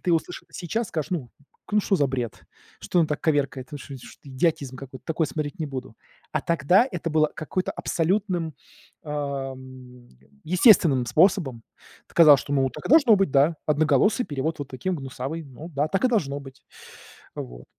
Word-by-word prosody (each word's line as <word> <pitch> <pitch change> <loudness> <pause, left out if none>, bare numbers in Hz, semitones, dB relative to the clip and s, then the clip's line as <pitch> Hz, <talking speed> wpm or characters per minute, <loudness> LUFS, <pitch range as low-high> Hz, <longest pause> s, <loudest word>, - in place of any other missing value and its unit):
ты 175 - 0
услыши 165 +2 -2
сейчас, 220 +6 -3
скажешь: 155 -3 -4
"Ну, 155 -10 -3 0.4
ну, 210 - +4
шо 200 -1 +1
за 145 -4 +2
бред, 125 -4 -4 0.4
что 180 - -1
он 160 - +3
так 150 - -3
коверкает, 140 -4 -1
вы 145 - -5
шо 140 - -9
шт 125 - -14
идиотизм 140 -1 -1
какой-то, 130 0 -11
такое 160 0 0
смотреть 150 +4 -4
не 160 - -2
буду", 130 -5 -7 0.4
а - - 0
тогда 170 - +3
это 170 -3 -4
было 155 0 +3
какой-то, 180 +4 -3
абсолютным, 175 -2 -1 0.5
э, - - -11
мм, 130 -3 -6 0.4
естественным 170 - +5
способом. 145 - +2 0.5
Т - - -22
казалось, 150 -5 +8
что, 140 - -6
ну, 135 -2 +2
так - - -9
и - - -5
должно 280 -8 +7
быть, 195 -5 +1
да, 145 +4 +4
одноголосый 155 - +3
перевод 145 +3 -3
вот 140 - -5
таким 180 +9 -3
гнусавый, 135 +3 -5
ну, 145 +4 -10
да, 145 +1 -1
так 195 +8 0
и - - +5
должно 150 - 0
быть, 135 -1 -13 0.7
вот. - - -8
150 Hz, 180 wpm, -25 LUFS, 135-170 Hz, 0.7 s, казалось